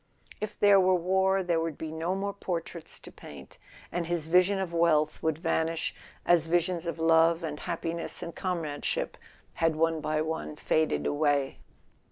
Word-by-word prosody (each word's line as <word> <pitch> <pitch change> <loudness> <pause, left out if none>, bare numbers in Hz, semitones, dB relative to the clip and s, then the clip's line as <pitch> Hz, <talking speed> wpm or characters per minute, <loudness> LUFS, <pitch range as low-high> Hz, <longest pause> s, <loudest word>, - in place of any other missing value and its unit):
If 215 - -6
there 205 -1 +6
were 185 0 +4
war 190 +2 +2
there 170 -2 +1
would 165 -2 -3
be 160 -1 -5
no 165 +3 -2
more 200 +1 -2
portraits 170 -4 -6
to - - -12
paint, 70 -2 -13 0.3
and 170 -1 -2
his 170 -2 -1
vision 180 +4 +3
of 190 -3 -3
wealth 155 -3 +2
would 160 -2 0
vanish 165 -1 -1 0.3
as 170 -2 +4
visions 175 0 0
of 170 - -3
love 165 +1 +4
and 150 -2 -4
happiness 170 0 -4
and 170 - -7
comrade¬ 165 -6 -3
ship - - -2 0.5
had 165 -1 +3
one 165 0 +1
by 155 0 0
one 160 -1 -4
faded 155 +1 0
away. 145 -2 +1
165 Hz, 170 wpm, -28 LUFS, 160-180 Hz, 0.5 s, there